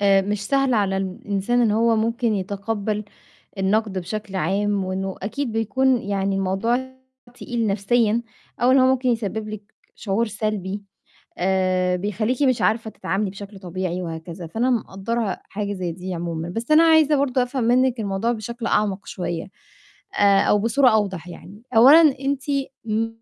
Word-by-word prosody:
آآ 195 -1 +4
مش 205 +1 -3
سهل 275 -1 +2
على 200 -3 +1
الإنسان 195 +4 -1
إن 225 - +3
هو 225 +1 +3
ممكن 230 +1 0
يتقبّل 205 +2 -3 0.5
النَقد 195 +1 +1
بشكل 195 +2 -5
عام، 195 +3 0
وإنه 190 +1 -3
أكيد 235 +5 -3
بيكون 245 +3 +1
يعني 195 -1 -1
الموضوع 230 +7 -1 0.4
تقيل 240 -2 -3
نَفْسيًا 215 +3 +1 0.4
أو 245 - +4
إن 265 - +6
هو 255 - +5
ممكن 260 -1 +2
يسبّب 220 -2 -2
لِك 210 0 -9 0.2
شعور 215 +3 -1
سلبي 205 -2 -3 0.6
آآ، 185 -1 +1
بيخلّيكِ 215 +7 -1
مش 255 -3 +2
عارفة 220 0 +1
تتعاملي 195 +1 -2
بشكل 200 +1 -10
طبيعي 185 -1 -4
وهكذا، 165 +1 -7
فأنا 230 +9 0
مُقدّرة 225 -2 -2
حاجة 205 0 -4
زي 180 -3 -3
دي 180 +2 -6
عمومًا، 165 -1 -4
بس 225 +9 -5
أنا 310 +1 +7
عايزة 315 -2 +5
برضه 270 -2 +1
أفهم 250 0 -2
منِّك 250 +1 +2
الموضوع 205 +3 -1
بشكل 235 +1 -5
أعمق 205 -3 0
شوية 175 0 -4 0.6
آآ، 200 -1 +4
أو 210 - +3
بصورة 235 +5 +3
أوضح 195 -6 0
يعني، 195 +4 -12
أولًا 270 +8 +9 0.2
أنتِ 275 0 -1 0.4
م 225 0 0
210 Hz, 150 wpm, -22 LUFS, 195-235 Hz, 0.6 s, أولًا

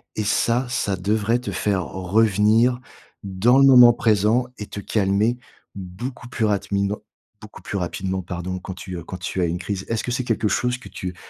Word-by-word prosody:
et 110 - -1
ça, 115 +4 +1
ça 100 -6 -1
devrait 110 +5 0
te 125 - -5
faire 95 -4 -1
revenir 110 +5 +2 0.4
dans 100 +7 +2
le 135 - +6
moment 125 -3 +8
présent 110 +2 +2
et 105 - -6
te 100 - -8
calmer 105 +3 +1 0.4
beaucoup 100 +7 -7
plus 115 -3 -1
rapidement 100 0 -1 0.4
beaucoup 105 0 -12
plus 100 - -4
rapidement 95 +1 -3
pardon, 90 +1 -5
quand 95 - -8
tu, 95 -1 -8
heu, 85 - -7
quand 90 - -7
tu 90 +1 -3
as 85 - +2
une 85 +1 -2
crise. 95 +1 -4
Est-ce 115 -1 -1
que 120 - -3
c'est 130 +1 -1
quelque 115 -2 0
chose 125 +3 0
que 130 - -13
tu, 90 -1 -6
105 Hz, 190 wpm, -22 LUFS, 95-115 Hz, 0.4 s, moment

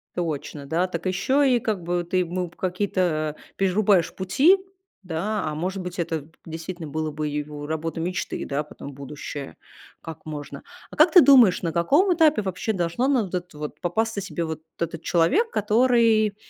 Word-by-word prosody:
Точно, 150 -4 -4
да. 170 +6 0
Так 185 - -5
еще 260 +8 +2
и - - +2
как 215 -7 -2
бы 175 0 -1
ты 180 +2 -2
ему 180 0 -1
какие-то 175 -4 -1 0.2
перерубаешь 195 -2 +2
пути, 270 - +4 0.5
да. 190 +5 -2
А, 150 - -4
может 185 +4 -3
быть, 180 0 -6
это 160 -3 -2 0.2
действительно 165 0 -6
было 155 +1 -3
бы 150 0 -3
его 150 0 -5
работа 160 +1 -3
мечты, 180 +2 -3
да, 145 +2 -2
потом 145 -1 -10
будущая. 140 0 -7 0.5
Как 160 -1 -9
можно? 145 -2 -7 0.3
А - - -9
как 310 +2 +6
ты 360 - +9
думаешь, 250 -9 +6
на 165 -2 -1
каком 290 - +3
этапе 310 -8 +4
вообще 190 +3 -2
должно 180 +8 0
на 260 -6 +3
вот 185 -1 -5
это 180 -4 -5
вот 150 0 -6
попасться 220 +4 -1
себе 175 -3 -3
вот 160 -1 -5 0.2
этот 165 -1 -3
человек, 330 - +2
который 220 -1 +3
180 Hz, 170 wpm, -24 LUFS, 160-215 Hz, 0.5 s, ты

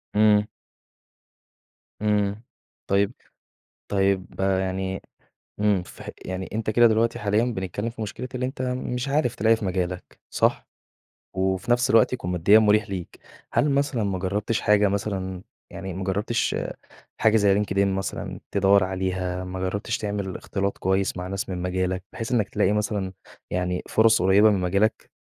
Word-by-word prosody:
إمم. 105 0 +5 1.5
إمم، 105 0 0 0.4
طيب، 100 +3 +2 0.8
طيب 95 -1 +1
يعني، 95 0 -1 0.6
إمم، 105 -3 +2
فهق - - -10
يعني 95 0 -4
أنت 110 0 -1
كده 120 +2 +6
دلوقتي 115 +1 +2
حاليًا 105 +2 +1
بنتكلّم 100 -1 -3
في 115 -1 -7
مشكلة 110 +4 -5
اللي 125 0 -1
أنت 130 0 -5
مش 125 0 -2
عارف 135 -4 +1
تلاقي 115 0 +3
في 110 - -6
مجالك 90 -1 -3
صح؟ - - +1 0.7
وفي 95 +3 0
نفس 120 +1 +3
الوقت 115 0 +5
يكون 90 -8 -3
ماديًا 90 +5 +5
مُريح 105 -1 +3
ليك، 95 -3 -6 0.3
هل 150 - +3
مثلًا 140 -4 +1
ما 100 -2 -1
جرّبتش 100 +4 -1
حاجة 105 0 +4
مثلًا، 95 -2 -3 0.3
يعني 95 -1 -6
ما 95 +2 -4
جرّبتش 105 +5 0 0.7
حاجة 110 0 +4
زي 100 -2 +4
LinkedIn 100 -1 -3
مثلًا 95 0 -3
تدوّر 100 0 +4
عليها، 95 -1 -2
ما 90 0 -6
جرّبتش 100 +4 -2
تعمل 100 -3 -3
إختلاط 100 0 -3
كويس 95 0 0
مع 90 0 -4
ناس 95 +1 -4
من 90 -2 -4
مجالك 90 0 -1
بحيث 115 +1 -5
إنّك 110 -5 +2
تلاقي 100 - +1
مثلًا 105 -2 -1 0.4
يعني 90 0 -1
فُرَص 110 -1 +4
قريّبة 100 +4 +6
من 100 -2 +1
مجالك؟ 100 +4 0
100 Hz, 150 wpm, -25 LUFS, 95-110 Hz, 1.5 s, كده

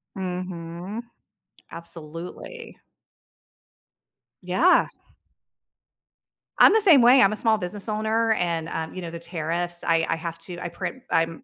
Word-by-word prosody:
Mhm. 180 +2 -5 0.7
Absolutely. 170 - -9 1.6
Yeah. 185 - +3 1.7
I'm - - +8
the 440 - +4
same 330 -10 +6
way. 250 +3 +7
I'm 195 - +4
a 215 - -3
small 220 -2 +2
business 200 +2 -1
owner 220 +1 0
and, 170 -5 -2
um, 160 0 -5
you 185 - -6
know, 170 -2 -6
the 170 - -7
tariffs. 170 +1 -1
I 165 -1 +2
I 165 - +1
have 165 0 -6
to 175 +1 -7
I 175 - -5
print 260 +9 -6
I'm 165 0 0
180 Hz, 130 wpm, -24 LUFS, 165-220 Hz, 1.7 s, I'm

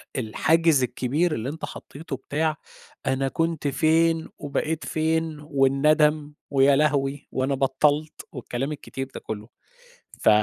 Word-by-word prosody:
الحاجز 145 +5 +2
الكبير 140 +7 0
اللي 115 +4 -3
أنت 160 +2 -5
حطيته 145 -1 -8
بتاع 155 +3 -1 0.5
أنا 135 0 +1
كنت 165 +1 -1
فين 160 +3 +2
وبقيت 155 +2 -2
فين 160 0 -1
والندم 150 +1 +2 0.2
ويا 140 0 +5
لهوي 140 -1 +1
وأنا 135 +1 0
بطّلت، 145 +3 +1
والكلام 130 +2 -4
الكتير 135 -2 -6
ده - - -6
كلّه. 110 +1 -7 0.7
ف - - +4
145 Hz, 120 wpm, -25 LUFS, 135-155 Hz, 0.7 s, ويا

